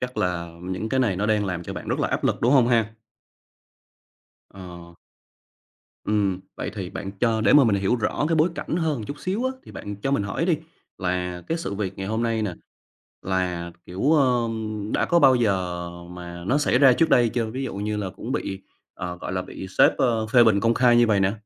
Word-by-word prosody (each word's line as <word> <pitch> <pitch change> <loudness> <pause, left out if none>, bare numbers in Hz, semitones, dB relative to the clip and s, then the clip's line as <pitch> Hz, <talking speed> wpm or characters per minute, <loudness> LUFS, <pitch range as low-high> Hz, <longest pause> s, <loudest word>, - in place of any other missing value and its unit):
chắc 125 0 -5
là 85 -2 -1
những 95 +4 -4
cái 130 +3 +1
này 105 -8 +1
nó 100 +3 -1
đang 105 -1 +2
làm 90 -3 -3
cho - - -6
bạn - - -7
rất - - -1
là - - 0
áp - - -2
lực, - - +1
đúng 120 +3 +3
hông 130 -4 +5
ha? 115 -2 +1 1.6
Ờ. 85 -2 -11 1.1
Ừm. 100 -3 0 0.2
Vậy - - -4
thì 95 -4 -5
bạn 95 - -6
cho 115 -2 +2
để 105 -2 +4
mà 145 -2 +7
mình 110 -4 +3
hiểu 100 +5 +1
rõ 120 +5 -1
cái 165 - +2
bối 160 +2 +4
cảnh 165 - -3
hơn 160 -5 0
một 110 - -6
chút 145 - -6
xíu 200 +7 -2
á, 260 - +1
thì - - -12
bạn 100 -1 -7
cho 135 - 0
mình 140 -7 +1
hỏi 100 - -2
đi, 170 -4 +3 0.4
là 90 -1 -2
cái 165 - -1
sự 130 -11 -4
việc 100 -2 -4
ngày 95 - -4
hôm 110 +2 -1
nay 115 -2 0
nè, 100 -5 -2 0.7
là, 90 -2 -2 0.2
kiểu, 115 - 0
ưm, 115 -6 0
đã - - +2
có 170 - +3
bao 135 -4 +6
giờ 90 -6 -1 0.2
mà 85 -1 -8
nó 135 +6 +2
xảy 145 -4 +2
ra 135 -2 +7
trước 160 +6 +2
đây 120 -3 +5
chưa? 115 0 -1
Ví 130 +4 -4
dụ 120 - -5
như 105 +1 -2
là 100 -3 -3
cũng - - -6
bị, 95 0 -3 0.3
ờ, 90 0 -5
gọi - - -5
là, 95 0 -1
bị 95 - -8
sếp, - - +6
ơ, 115 -4 +1
phê 120 +2 +5
bình 110 -3 +4
công 115 +2 +2
khai 120 -1 +4
như 120 0 +5
vầy 105 -3 +2
nè. 95 0 +2
110 Hz, 230 wpm, -24 LUFS, 95-125 Hz, 1.6 s, mà